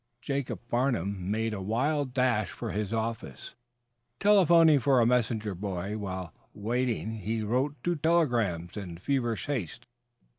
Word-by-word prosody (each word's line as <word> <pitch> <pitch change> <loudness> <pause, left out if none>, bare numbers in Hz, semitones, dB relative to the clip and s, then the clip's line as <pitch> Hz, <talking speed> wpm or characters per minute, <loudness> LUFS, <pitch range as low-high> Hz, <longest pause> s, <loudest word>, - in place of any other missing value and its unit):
Jacob 140 +1 -3
Farnum 100 -7 -1
made 110 +1 0
a 100 - -4
wild 130 +7 0
dash 125 -6 +1
for - - -5
his 105 -1 -2
office, 110 - -4 0.7
telephoning 170 -7 +6
for 135 0 +3
a 115 - +4
messenger 115 -3 +1
boy. 95 +1 -4
While 95 -5 -5 0.2
waiting 115 0 -1
he 110 +2 -2
wrote 130 +7 0
two 175 0 +1
telegrams 120 - +1
in 90 -5 -6
feverish 120 +2 -1
haste. 120 - -4
115 Hz, 135 wpm, -29 LUFS, 100-135 Hz, 0.7 s, telephoning